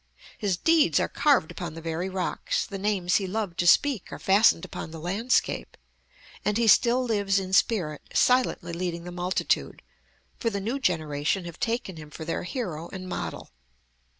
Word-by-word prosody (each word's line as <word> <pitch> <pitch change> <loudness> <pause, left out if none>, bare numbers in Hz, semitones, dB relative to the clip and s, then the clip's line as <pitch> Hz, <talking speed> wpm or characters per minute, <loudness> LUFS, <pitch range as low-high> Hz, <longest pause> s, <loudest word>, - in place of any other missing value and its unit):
His 200 -5 -1
deeds 325 - +4
are - - +1
carved 280 - +2
upon 170 -3 -6
the - - -6
very 165 +3 -3
rocks; 185 -1 -2
the 195 - -7
names 190 -3 +1
he 195 - -2
loved 200 -3 -3
to 175 - +2
speak 270 +1 +3
are - - -6
fastened 195 -3 +4
upon - - -7
the 160 0 -8
landscape; 200 +10 -1 0.7
and 210 0 +1
he 235 - +2
still 240 +4 +5
lives 205 -4 +1
in 190 -1 -3
spirit, 180 - +2
silently 250 -9 +2
leading 170 -1 -3
the 175 - -7
multitude, 180 +1 -1 0.6
for 230 - 0
the 200 -2 -3
new 230 +8 -2
generation 160 - 0
have 170 -1 -9
taken 225 -6 -2
him 150 -1 -10
for 160 +1 -8
their 165 - -2
hero 175 - -4
and 185 -1 -7
model. 180 - -5
190 Hz, 175 wpm, -26 LUFS, 170-225 Hz, 0.7 s, still